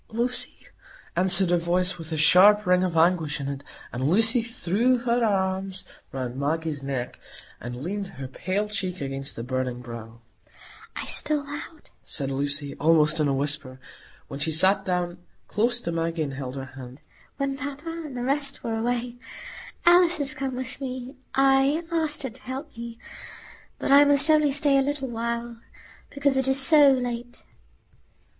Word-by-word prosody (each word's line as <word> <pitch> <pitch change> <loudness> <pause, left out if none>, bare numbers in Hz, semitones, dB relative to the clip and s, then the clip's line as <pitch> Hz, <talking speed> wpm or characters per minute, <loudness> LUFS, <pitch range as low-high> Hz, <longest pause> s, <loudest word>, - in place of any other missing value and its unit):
"Lucy!" 240 +3 +1 0.6
answered 185 0 +5
a 175 - +3
voice 180 +2 -1
with 165 0 -8
a 160 - -2
sharp 195 +7 +6
ring 180 0 +3
of 175 -3 -1
anguish 160 -3 +2
in 140 - -4
it; 140 0 -5 0.3
and 130 +4 -1
Lucy 225 +6 +3
threw 235 +1 0
her 240 0 0
arms 190 -2 -1 0.3
round 130 -2 -5
Maggie's 150 +1 -2
neck, 135 -3 -4 0.4
and 120 0 -7
leaned 200 +3 -3
her 130 -6 -8
pale 190 +10 -2
cheek 190 -3 -4
against 135 0 -5
the 115 - -6
burning 130 0 -3
brow. 115 -1 -10 0.8
"I - - -5
stole 300 -2 0
out," 290 +2 -9
said 135 -2 -1
Lucy, 140 +1 -1
almost 155 0 +3
in 150 - +2
a 140 - +1
whisper, 140 -2 -2 0.5
while 140 - -7
she 160 +2 -1
sat 190 +6 +4
down 180 -1 -2 0.3
close 240 +3 0
to 170 - -3
Maggie 165 -1 -1
and 140 -2 -5
held 130 -1 -6
her 135 -1 -5
hand, 130 0 -11 0.4
"when 275 -1 -2
papa 285 +3 -7
and 315 -6 -7
the 245 - -3
rest 275 +2 -2
were 225 -1 -2
away. 240 +1 -2 0.7
Alice 350 -1 +5
is 275 -2 +1
come 265 -1 -4
with 255 +2 -6
me. 255 0 -5 0.2
I 270 +4 +3
asked 315 -3 0
her 265 - -4
to 255 +3 -15
help 265 +4 -7
me. 235 0 -8 0.8
But - - -2
I 280 +1 +8
must 285 +2 +4
only 300 -2 +4
stay 280 0 +3
a - - +3
little 275 -1 -2
while, 235 0 -4 0.5
because 280 -1 +1
it 265 0 +1
is 265 0 +4
so 290 0 +8
late." 245 -2 -2
205 Hz, 170 wpm, -25 LUFS, -, 0.8 s, I